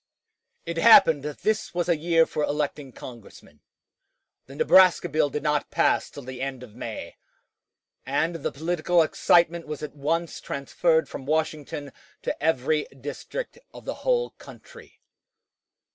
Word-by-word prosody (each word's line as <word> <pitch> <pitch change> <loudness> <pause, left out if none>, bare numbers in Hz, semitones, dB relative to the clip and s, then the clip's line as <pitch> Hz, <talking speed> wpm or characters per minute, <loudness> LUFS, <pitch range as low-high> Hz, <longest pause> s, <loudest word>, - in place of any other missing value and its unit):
It 170 0 -4
happened 165 -7 +7
that 150 -1 -6
this 215 -3 -1
was 175 -1 0
a 170 - +3
year 165 +1 +3
for 155 - -4
electing 145 -2 -2
Congressmen. 115 - -13 0.9
The 135 - -11
Nebraska 185 +4 +5
bill 150 0 +1
did 150 +1 -4
not 150 -1 0
pass - - +1
till 140 - -10
the 130 0 -8
end 135 -2 -4
of 115 -4 -13
May, - - -7 0.9
and 160 +6 -1
the 150 - -3
political 170 +2 +1
excitement 170 +1 +2
was 150 0 -6
at 150 -1 -7
once 165 +3 -2
transferred 160 +4 0
from 135 - -8
Washington 150 -3 -2 0.3
to - - -4
every 150 0 +1
district 145 - -7 0.2
of - - -11
the - - -3
whole 485 -1 +1
country. 480 -2 -14
155 Hz, 145 wpm, -25 LUFS, 140-170 Hz, 0.9 s, happened